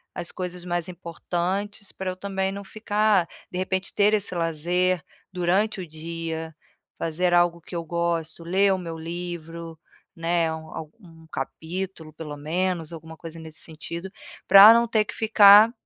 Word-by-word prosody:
as 175 -2 -4
coisas 180 -1 -5
mais 175 -1 -2
importantes, 185 +4 -3
pra 190 -1 -4
eu - - -7
também 195 -1 -2
não 200 +1 -6
ficar 210 -3 +1 0.2
de 180 - -4
repente 190 0 -2
ter 205 +1 +3
esse 205 -3 +1
lazer 170 +1 0 0.3
durante 185 +3 +1
o 175 - -7
dia, 160 0 -6 0.4
fazer 175 +2 0
algo 175 -1 +3
que 175 - -10
eu 170 - -2
gosto, 170 -1 -2
ler 190 +3 +3
o - - 0
meu 165 -2 -6
livro, 170 -1 -6 0.4
né, 165 0 +1
um 160 0 -8
alg 155 -1 -7
1 165 -4 -16
capítulo, 160 +3 -5
pelo 150 -2 -7
menos, 170 +2 -2
alguma 160 0 -10
coisa 165 -1 -9
nesse 160 -1 -8
sentido, 170 +3 -6 0.4
pra 200 +3 +11
não 235 0 +3
ter 220 -2 +2
que - - -7
ficar, 215 0 +8
175 Hz, 160 wpm, -25 LUFS, 165-190 Hz, 0.4 s, pra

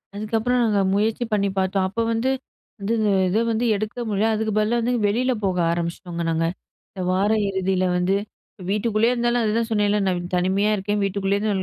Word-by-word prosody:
அதுக்கப்புறம் 225 +4 0
நாங்க 210 -3 +2
முயற்சி 220 +4 +1
பண்ணி 200 -1 +2
பார்த்தோம். 190 0 +1
அப்ப 230 +4 -2
வந்து 230 +4 0 0.5
வந்து 205 +4 -1 0.3
இத 190 +5 +1
வந்து 225 +2 0
எடுக்க 215 +4 -4
முடியல, 210 +2 +1
அதுக்கு 220 0 -1
பதிலா 215 +3 +2
வந்து 245 +2 0
வெளியில 250 +5 +1
போக 185 -2 0
ஆரம்பிச்சிட்டோங்க 170 0 -3
நாங்க. 165 0 +1 0.5
இந்த 190 - -7
வார 195 +3 +2 0.2
இறுதியில 190 -1 0
வந்து 180 +2 +1 0.5
வீட்டுக்குள்ளயே 215 +3 +2
இருந்தாலும் 240 -1 +1
அதுதான் 225 +1 0
சொன்னேன்ல, 210 -1 +2
நான் 175 -1 -2
தனிமையா 190 +4 +1
இருக்கேன். 205 +1 -2
வீட்டுக்குள்ளயே 195 0 0
இருந்து 215 -1 0
205 Hz, 165 wpm, -23 LUFS, 190-225 Hz, 0.5 s, நாங்க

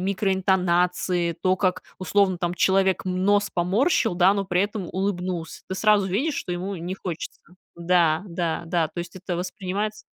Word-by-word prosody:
микроинтонации, 180 -2 +1
то, 185 +3 0
как 185 -1 0 0.2
условно 190 0 +2
там 175 0 -2
человек 190 +1 +2
нос 200 +3 +2
поморщил, 210 - +2
да, 185 +3 +4
но 200 - -1
при 180 -1 +1
этом 205 -1 -2
улыбнулся. 180 -3 -3
Ты 190 - -4
сразу 210 -1 +3
видишь, 260 - 0
что 180 - -4
ему 185 +2 -4
не 175 +3 -4
хочется. 180 -4 -6 0.3
Да, 170 -1 +2
да, 170 -1 -2
да, 165 -1 +1
то 175 - -10
есть 175 +1 -6
это 185 -1 -4
воспринимается 195 +4 -4
185 Hz, 160 wpm, -24 LUFS, 175-195 Hz, 0.3 s, да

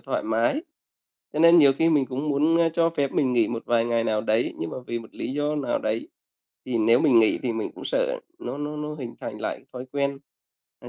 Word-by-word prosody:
thoải - - -2
mái. 115 - 0 0.7
Cho - - -4
nên 170 +1 +7
nhiều 140 -4 +7
khi 160 +5 +2
mình 145 -5 +3
cũng 135 +4 -4
muốn, 150 +4 +2
ơ, 165 -1 +4
cho 165 0 +2
phép 140 -4 -1
mình 130 -3 +1
nghỉ 115 -3 +3
một 115 -1 -4
vài 115 -1 +2
ngày 115 -1 0
nào 110 -1 +1
đấy, 110 +2 0
nhưng 80 - -4
mà - - -6
vì 120 - -3
một 115 - -13
lý 130 - -4
do 145 +1 -1
nào 135 -4 -1
đấy 110 +1 -3 0.6
thì 125 -3 -1
nếu 115 +2 +4
mình 125 -7 +5
nghỉ 110 - +3
thì 125 - -1
mình 110 -1 -3
cũng - - -10
sợ - - 0 0.2
nó 340 - -6
nó 150 +1 -4
nó 150 0 -4
hình 125 -6 -7
thành - - -6
lại - - -4
thói 125 0 -6
quen. 140 -1 -1 0.6
À, - - -10
135 Hz, 245 wpm, -25 LUFS, 115-150 Hz, 0.7 s, nên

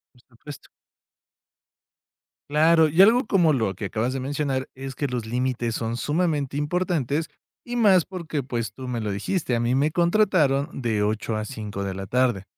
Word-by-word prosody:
Por 120 - -23
supuesto. 135 +4 -13 1.8
Claro, 160 +1 +4
y 165 +5 +4
algo 235 +5 +6
como 170 -7 +3
lo 110 -7 0
que 100 - -6
acabas 115 +5 -1
de 135 - -3
mencionar, 135 -1 -2
es 135 0 -7
que 145 - -2
los 120 -3 -3
límites 120 -1 -2
son 115 0 -2
sumamente 145 -1 -1
importantes, 160 -2 -1 0.4
y 245 0 -4
más 195 -7 +5
porque, 160 -7 -4
pues, 115 -4 -4
tú 130 +1 -8
me 120 -2 -2
lo 105 -2 -3
dijiste: 125 - -1
"A 115 - 0
mí 120 +2 +1
me 145 +3 +2
contrataron 170 -7 +2
de 110 -3 0
8 110 +1 -1
a 110 - -3
5 105 -5 -6
de 95 - -3
la 95 +1 -6
tarde", 120 -4 +1
135 Hz, 175 wpm, -24 LUFS, 115-160 Hz, 1.8 s, algo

